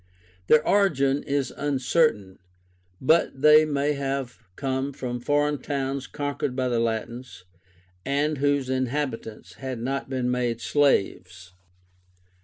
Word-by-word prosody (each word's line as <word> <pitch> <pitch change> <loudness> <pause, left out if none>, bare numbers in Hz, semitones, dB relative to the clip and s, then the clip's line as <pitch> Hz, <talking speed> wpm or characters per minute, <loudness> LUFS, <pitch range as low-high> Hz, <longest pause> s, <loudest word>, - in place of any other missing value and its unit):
Their 155 0 +4
origin 145 -9 +2
is 140 -2 -2
uncertain; 135 - 0 0.6
but 155 -1 +2
they 150 +2 +7
may 145 0 0
have 135 -3 -3 0.2
come 135 0 -2
from 125 -2 -4
foreign 145 +2 +1
towns 135 -1 -3
conquered 145 -3 -3
by 130 -1 0
the 120 -1 0
Latins, 115 -1 -4 0.6
and 145 +2 0
whose 145 -1 +1
inhabitants 130 - -3
had 130 -2 -4
not 135 +3 -3
been 125 -2 -1
made 120 -2 -1
slaves. 90 -10 0
135 Hz, 115 wpm, -25 LUFS, 125-145 Hz, 0.6 s, they